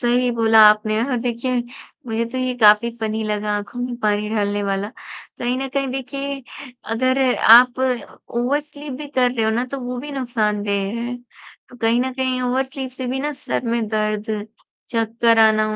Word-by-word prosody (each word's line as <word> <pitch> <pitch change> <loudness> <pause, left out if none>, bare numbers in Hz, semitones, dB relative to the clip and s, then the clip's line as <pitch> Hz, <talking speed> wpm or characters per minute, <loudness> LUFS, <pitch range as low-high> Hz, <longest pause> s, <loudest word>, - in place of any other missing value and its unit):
सही 245 0 +2
बोला 225 -1 +3
आपने 215 +1 +2
और 255 -1 -1
देखिए 245 +1 -1 0.5
मुझे 225 0 -1
तो 255 - -2
ये 255 0 -1
काफ़ी 210 +2 +6
फनी 220 0 -2
लगा 210 0 -2
आँखों 205 +4 -7
में 245 0 -3
पानी 210 -1 0
डालने 205 -1 0
वाला। 200 +1 -2 0.5
कहीं 245 +1 -1
न 270 - -3
कहीं 275 0 -1
देखिए 275 +1 -4 0.5
अगर 260 +3 +1 0.3
आप 250 +1 +7 0.6
ओवर 260 +5 +1
स्लीप 295 -1 -10
भी 300 - -6
कर 255 -3 +2
रहे 230 -3 -1
हो 220 - +2
ना 240 +3 0
तो 275 - -3
वो 250 0 -5
भी 295 +1 -7
नुकसानदेह 210 -6 -1 0.2
है। 245 +1 -4 0.5
तो 245 - -15
कहीं 230 +1 +2
न 260 +1 -1
कहीं 260 -1 -1
ओवर 250 +1 +1
स्लीप 265 -1 -6
से 260 0 -6
भी 260 +2 -2
ना 295 +2 -2
सर 265 - -4
में 230 -1 0
दर्द, 215 0 -2 0.4
चक्कर 230 0 +2
आना, 215 -1 +5
240 Hz, 185 wpm, -21 LUFS, 215-255 Hz, 0.6 s, आप